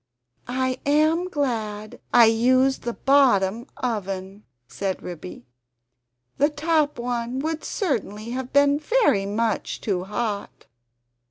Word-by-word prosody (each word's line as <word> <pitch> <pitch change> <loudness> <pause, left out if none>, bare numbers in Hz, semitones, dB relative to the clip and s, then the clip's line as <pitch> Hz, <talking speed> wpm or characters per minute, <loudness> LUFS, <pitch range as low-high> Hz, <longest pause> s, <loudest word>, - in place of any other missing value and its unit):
"I 255 +1 -1
am 310 +5 +2
glad 220 - -3
I 240 -1 +7
used 255 +4 +3
the 235 - -3
BOTTOM 240 -5 +3
oven," 195 -4 -4 0.2
said 195 +4 -4
Ribby, 175 -6 -8 0.9
"the 290 +2 +4
top 305 0 0
one 240 0 -3
would 315 +3 -3
certainly 230 - -3
have 255 0 -4
been 285 +1 +4
very 305 - +2
much 220 +1 -1
too 185 -4 -2
hot." 210 0 -4
240 Hz, 110 wpm, -24 LUFS, 210-285 Hz, 0.9 s, I